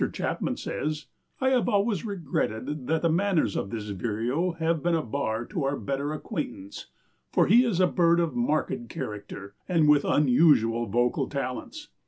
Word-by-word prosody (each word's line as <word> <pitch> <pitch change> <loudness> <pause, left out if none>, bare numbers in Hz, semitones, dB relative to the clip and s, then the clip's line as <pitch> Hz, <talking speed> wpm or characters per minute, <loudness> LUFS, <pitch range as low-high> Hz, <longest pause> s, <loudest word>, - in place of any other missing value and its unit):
Chapman - - -2
says: 155 0 -3 0.3
"I 260 - +2
have 250 -2 +2
always 205 -3 +1
regretted 150 - -3
that 160 +1 0
the 170 - +3
manners 175 - +1
of 100 - -2
this 105 -1 -5
vireo 120 - -1
have 165 -1 0
been 170 +1 +1
a 160 - 0
bar 115 -2 -2
to 175 -8 -3
our 135 +1 0
better 140 +1 -3
acquaintance, 150 - -6 0.4
for - - +4
he 235 +6 +6
is 225 -8 0
a 185 - +6
bird 170 -1 +3
of 170 +3 0
marked 155 - -1
character 100 -1 -7 0.2
and 165 -4 +3
with 150 -1 +5
unusual 125 -5 +3
vocal 120 +4 0
talents. 140 - -5
150 Hz, 165 wpm, -27 LUFS, 120-175 Hz, 0.4 s, he